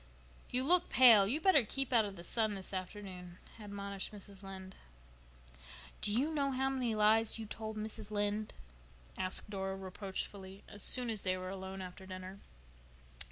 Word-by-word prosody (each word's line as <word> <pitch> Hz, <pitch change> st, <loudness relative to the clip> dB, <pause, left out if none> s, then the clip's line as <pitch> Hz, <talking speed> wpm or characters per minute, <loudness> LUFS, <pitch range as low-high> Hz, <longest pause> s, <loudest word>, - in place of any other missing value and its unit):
"You 250 Hz, +1 st, +1 dB
look 350 Hz, +5 st, +7 dB
pale. 225 Hz, -6 st, +8 dB
You'd 295 Hz, +9 st, -1 dB
better 370 Hz, -9 st, +6 dB
keep 270 Hz, +4 st, -1 dB
out 225 Hz, -3 st, +5 dB
of 200 Hz, -1 st, -6 dB
the 170 Hz, -, -10 dB
sun 220 Hz, +2 st, +1 dB
this 190 Hz, 0 st, -6 dB
afternoon," 185 Hz, -2 st, -7 dB, 0.2 s
admonished 200 Hz, -2 st, -5 dB
Mrs. 200 Hz, -2 st, -10 dB
Lynde. 190 Hz, -1 st, -9 dB, 1.3 s
"Do 205 Hz, -, +1 dB
you 275 Hz, +9 st, +1 dB
know 280 Hz, -2 st, +1 dB
how 265 Hz, 0 st, 0 dB
many 250 Hz, -4 st, -1 dB
lies 215 Hz, +2 st, +3 dB
you 225 Hz, -, -6 dB
told 220 Hz, +1 st, -6 dB
Mrs. 215 Hz, 0 st, -5 dB
Lynde?" 205 Hz, 0 st, -1 dB, 0.6 s
asked 185 Hz, +2 st, -4 dB
Dora 190 Hz, -1 st, -3 dB
reproachfully, 190 Hz, 0 st, -6 dB
as 205 Hz, -, -7 dB
soon 250 Hz, -2 st, +1 dB
as 215 Hz, -3 st, -3 dB
they 185 Hz, -1 st, -1 dB
were 185 Hz, 0 st, -5 dB
alone 190 Hz, 0 st, -6 dB
after 185 Hz, +1 st, -10 dB
dinner. 185 Hz, +1 st, -8 dB
205 Hz, 160 wpm, -34 LUFS, 190-225 Hz, 1.3 s, pale